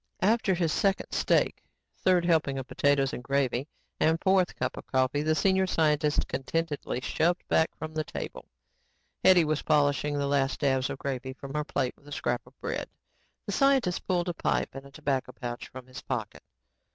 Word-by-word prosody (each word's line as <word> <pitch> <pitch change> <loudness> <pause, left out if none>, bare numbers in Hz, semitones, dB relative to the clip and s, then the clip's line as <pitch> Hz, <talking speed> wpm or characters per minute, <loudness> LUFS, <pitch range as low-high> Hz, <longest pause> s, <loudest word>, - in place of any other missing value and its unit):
After 210 -2 +3
his 170 -3 0
second 195 -1 +1
steak, - - +1 0.4
third 180 -2 +3
helping 160 -5 +2
of 135 -1 -5
potatoes 140 -1 +2
and 125 - -5
gravy 135 0 0 0.3
and 160 +1 +3
fourth 190 -1 +2
cup - - -2
of - - -9
coffee, 130 +2 +1
the 155 +1 +1
senior 190 +2 +3
scientist 150 -3 +2
contentedly 145 -2 -2
shoved 170 +7 0
back 160 - +3
from 155 0 -6
the 155 0 -1
table. - - -7 0.8
Hetty 185 -3 +7
was 155 0 0
polishing 145 -1 +2
the 140 - 0
last 140 -1 0
dabs 135 -2 +2
of - - -4
gravy 130 -2 -4
from 135 0 -9
her 150 0 0
plate 135 -4 -1
with 145 - -23
a - - -11
scrap 120 -3 -1
of - - -20
bread. - - -3 0.6
The - - -3
scientist 265 -7 +2
pulled 180 -1 +1
a 175 - -1
pipe - - -1
and 135 +1 -9
tobacco 135 -2 -2
pouch 120 -2 -6
from 130 -1 -10
his 130 0 -10
pocket. - - -4
145 Hz, 180 wpm, -28 LUFS, 135-170 Hz, 0.8 s, Hetty